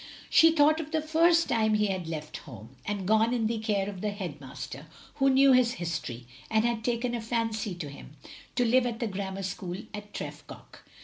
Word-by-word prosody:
She 325 - +8
thought 310 0 +4
of 315 -2 -5
the 315 0 0
first 330 +2 +3
time 220 -2 +2
he 210 0 +2
had 185 -4 -2
left 155 -2 -5
home, 115 -3 -12
and 200 -3 -3
gone, 220 +3 +3
in 230 -2 0
the 225 0 0
care 205 -3 0
of 195 -3 -6
the 210 - 0
head 180 -8 -6
master, 135 +2 -8 0.3
who 270 0 +4
knew 270 +1 +6
his 250 -2 +4
history, 155 - -4 0.2
and 220 +1 +2
had 235 -2 0
taken 240 +1 -1
a 235 - -2
fancy 225 -3 -2
to 170 -4 -6
him, 140 +1 -11 0.4
to 245 0 +2
live 245 +2 +4
at 230 -1 -4
the 235 - -1
grammar 195 -1 -4
school 180 -1 -4 0.2
at 210 0 -8
Tref - - -6
goch. - - -13
215 Hz, 210 wpm, -28 LUFS, 180-245 Hz, 0.4 s, She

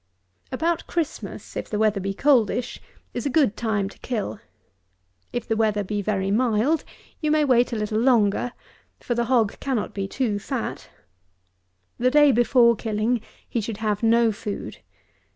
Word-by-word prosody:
146. 330 +5 -1
About - - -19
Christmas, 335 -4 -4
if - - -4
the 210 - -2
weather 215 -1 +2
be 195 +1 -2
coldish, 245 +1 +1 0.3
is 240 - -2
a - - 0
good 275 -6 +2
time 215 -4 -1
to 195 - -13
kill. 215 -4 -3 0.9
If 240 - -4
the 225 - +1
weather 215 -2 +1
be 205 +1 -2
very 195 -1 -1
mild, 245 +7 +2 0.4
you 305 - -1
may 305 0 +3
wait 245 -2 +3
a - - -2
little 215 0 -1
longer; 235 -2 +3 0.5
for 240 - -2
the 235 0 0
hog 230 -4 +1
cannot 260 -6 -2
be 195 -1 -3
too 215 -2 -1
fat. - - -4 1.1
The 250 - +3
day 295 +1 +6
before 240 0 +4
killing 220 +2 -1 0.3
he 235 - -2
should 215 0 -5
have 210 -2 -1
no 230 0 +4
food. 205 0 -6
230 Hz, 165 wpm, -24 LUFS, 210-255 Hz, 1.1 s, day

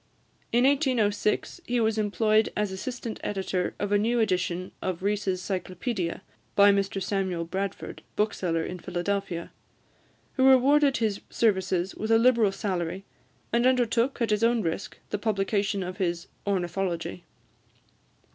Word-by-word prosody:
In 240 +1 +3
1806, 255 - +1
he 245 0 +1
was 220 -1 +1
employed 215 +1 +2
as 210 -2 0
assistant 230 +3 -5
editor 190 -2 -2
of 205 0 -3
a 205 - +4
new 235 +3 +1
edition 185 -3 0
of 185 -1 -3
Rees' 200 -2 0
Cyclopedia, 185 0 -3 0.3
by 200 0 +7
Mr 195 0 0
Samuel 190 -3 -1
Bradford, 195 +3 -4
bookseller 180 -6 0
in 180 +2 -5
Philadelphia, 180 -1 -3 0.9
who 260 - +4
rewarded 275 +2 +5
his 215 -3 -1
services 190 -4 +1
with 220 - -4
a 225 - +6
liberal 230 -3 +4
salary, 190 -1 -3 0.5
and 240 +2 +4
undertook, 245 0 +2
at 225 - 0
his 210 +1 +1
own 230 -1 +3
risk, 165 +4 -3
the 210 - -1
publication 200 -1 0
of 180 +1 -6
his 175 -2 -1 0.2
"Ornithology." 180 -2 -2
200 Hz, 135 wpm, -27 LUFS, 185-225 Hz, 0.9 s, by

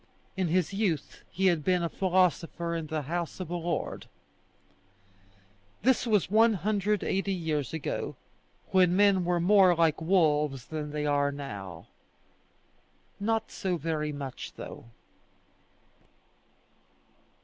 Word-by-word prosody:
In 190 -2 0
his 180 +2 +1
youth 195 -7 -2
he 190 +3 -1
had 170 -5 +3
been 180 0 +2
a - - +1
philosopher 175 -2 0
in 165 -2 -4
the 155 -1 -3
house 170 +5 -4
of 180 -3 -6
a - - -1
lord. 170 0 -3 1.8
This 255 0 +3
was 210 -4 +2
180 210 -2 +2
years 155 -7 -2
ago, 160 -3 -4 0.6
when 180 -2 +4
men 200 -2 +4
were 175 0 +1
more 185 0 +5
like 160 -2 +2
wolves 150 -7 +2
than 155 -2 -5
they 150 0 -3
are 145 -1 +2
now. 100 - -7 1.3
Not 225 +2 -1
so 185 -4 -2
very 155 -1 -2
much 140 -3 -7
though. - - -9
170 Hz, 115 wpm, -28 LUFS, 150-190 Hz, 1.8 s, more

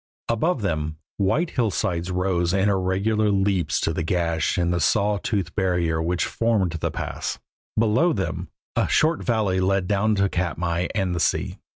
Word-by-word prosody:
Above 120 +3 +1
them, 80 -4 -2 0.2
white 135 - +1
hillsides 95 -7 -1
rose 90 -1 0
in 95 +1 +2
irregular 100 +3 +1
leaps 95 -2 +1
to 80 - 0
the 85 - -2
gash 85 0 0
in 85 -1 +1
the 85 - 0
saw 105 +4 +2
toothed 95 -7 -2
barrier 90 -4 0
which 85 +1 0
formed 110 -6 +1
the 85 - -2
pass; - - -4 0.4
below 115 +10 +3
them 95 -8 -3 0.3
a - - +2
short 160 +1 +2
valley 105 -6 +1
led 95 0 +1
down 105 +2 +2
to 100 0 +2
Katmai 85 -1 -1
and 95 -4 0
the 85 - -2
sea. - - 0
95 Hz, 165 wpm, -24 LUFS, 85-105 Hz, 0.4 s, below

